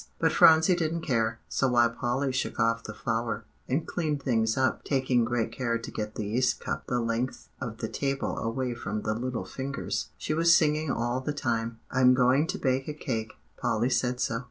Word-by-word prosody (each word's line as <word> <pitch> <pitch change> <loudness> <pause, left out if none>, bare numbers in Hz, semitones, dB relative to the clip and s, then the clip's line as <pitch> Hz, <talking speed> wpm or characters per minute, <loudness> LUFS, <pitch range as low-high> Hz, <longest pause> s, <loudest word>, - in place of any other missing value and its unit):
But - - +2
Phronsie 160 +3 +6
didn't 165 -1 -1
care; 115 -4 0
so 135 - +1
while 120 -2 +4
Polly 130 +3 -1
shook 130 0 -2
off 115 0 +1
the 105 - -6
flour, 115 -1 -2 0.2
and 140 +5 0
cleaned 150 -5 -2
things 115 -4 +1
up, 130 0 +1
taking 130 -3 +2
great 115 0 -1
care 120 -3 -1
to 115 - -8
get 105 0 -4
the 105 - -3
yeast 125 +5 +1
cup - - -4
the 125 - 0
length 115 +2 -2
of 115 -3 -4
the 110 - -3
table 135 +3 -2
away 120 +2 -2
from 105 -3 -4
the 110 - 0
little 125 +2 -3
fingers, 140 +1 -3
she - - -2
was 170 +2 +5
singing 155 -2 +1
all 120 +1 -1
the 145 +3 -2
time, 115 -4 -2
"I'm 125 -1 +5
going 130 +4 +3
to 190 +3 -2
bake 130 -3 0
a 150 - -4
cake 115 -7 -3 0.2
Polly 115 +3 0
said 125 -1 +1
so." 115 -2 0
125 Hz, 200 wpm, -28 LUFS, 115-140 Hz, 0.2 s, Phronsie